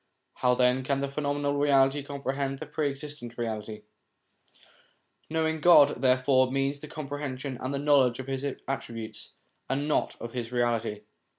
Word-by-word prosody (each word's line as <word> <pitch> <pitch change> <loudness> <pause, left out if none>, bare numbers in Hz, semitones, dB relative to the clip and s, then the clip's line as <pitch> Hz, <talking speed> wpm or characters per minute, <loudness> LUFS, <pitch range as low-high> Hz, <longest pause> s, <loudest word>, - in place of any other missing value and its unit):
How 125 -1 +3
then 125 +1 +3
can 135 +1 0
the 140 - 0
phenomenal 145 0 -1
reality 140 0 +4
comprehend 140 -1 -3
the - - -7
Pre 150 -2 -1
existent 140 -4 -7
Reality? 110 -2 -4 1.5
Knowing 160 0 0
God, 150 -6 +6
therefore, 130 0 +3
means 135 +1 0
the 150 - -9
compre 145 -2 -6
hension 130 -2 -5
and 130 - -2
the 140 - -1
knowledge 140 -4 +3
of 130 - -6
His 135 0 -3 0.2
attributes, 115 -5 -5 0.4
and 140 +3 -1
not 155 - 0
of 115 - -7
His 120 -2 -4
Reality. 115 -3 0
135 Hz, 155 wpm, -28 LUFS, 125-145 Hz, 1.5 s, God